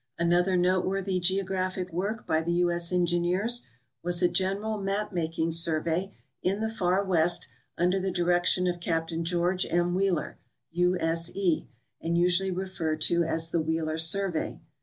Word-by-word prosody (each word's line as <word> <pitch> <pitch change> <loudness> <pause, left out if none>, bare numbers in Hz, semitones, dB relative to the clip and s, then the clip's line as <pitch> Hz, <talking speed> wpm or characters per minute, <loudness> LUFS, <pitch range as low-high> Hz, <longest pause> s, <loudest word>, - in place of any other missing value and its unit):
Another 175 +2 +2
noteworthy 185 +1 +1
geographic 185 0 -1
Avork 200 +6 -3
by 160 0 +1
the 170 +1 -1
U. 175 0 +2
S. 170 0 +1
Engineers 180 +6 +2 0.4
was 175 +1 -1
a - - +6
general 195 +4 -1
map 200 +1 -2
making 165 -1 -1
survey 165 +3 +1 0.3
in 195 +3 0
the 220 0 -1
far 185 -2 +1
west 175 -2 +1 0.3
under 180 +2 +2
the 190 +1 -1
di 175 -1 -1
rection 175 +1 +2
of 175 -1 -1
Capt. 165 -1 -2
George 175 +2 0
M. 175 +1 +1
Wheeler, 185 -4 -1 0.3
U. 180 +2 +2
S. 165 +1 +1
E., 185 -5 0 0.3
and 170 +1 -1
usually 180 +2 +2
referred 180 -4 -3
to 170 +2 +2
as 165 0 0
the 170 - +1
Wheeler 160 0 -2
survey. 175 +1 +1
175 Hz, 160 wpm, -27 LUFS, 170-190 Hz, 0.4 s, a